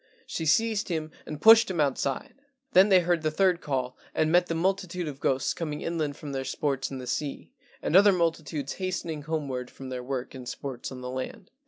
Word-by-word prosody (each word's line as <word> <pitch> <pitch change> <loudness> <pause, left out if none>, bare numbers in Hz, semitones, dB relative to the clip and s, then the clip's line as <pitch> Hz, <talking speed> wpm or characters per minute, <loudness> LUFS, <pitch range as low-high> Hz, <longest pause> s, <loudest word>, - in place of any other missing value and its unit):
She 160 - -3
seized 220 +4 +2
him 160 -2 -2 0.2
and 150 -1 -6
pushed 225 +4 +8
him 180 -3 -2
outside. 140 -2 0 0.4
Then 195 -1 +6
they 185 -2 +6
heard 175 -1 +1
the 155 - +1
third 180 +2 +2
call, 130 -3 -2 0.2
and 155 0 +2
met 175 +1 +4
the 165 - -2
multitude 180 0 -1
of 140 -2 -6
ghosts 135 -2 +1
coming 150 -3 -4
inland 155 -4 -2
from 145 - -7
their 135 -1 -2
sports 135 0 -1
in 135 - -6
the 130 - -7
sea, 140 +2 -3 0.3
and - - 0
other 200 +2 +8
multitudes 160 -5 -1
hastening 170 -4 -3
homeward 140 -5 -3
from 135 -1 -9
their 125 -1 -4
work 130 0 -4
and 125 -2 -7
sports 135 -3 -6
on 130 -1 -8
the 125 0 -5
land. 130 +8 -6
155 Hz, 205 wpm, -27 LUFS, 135-175 Hz, 0.4 s, pushed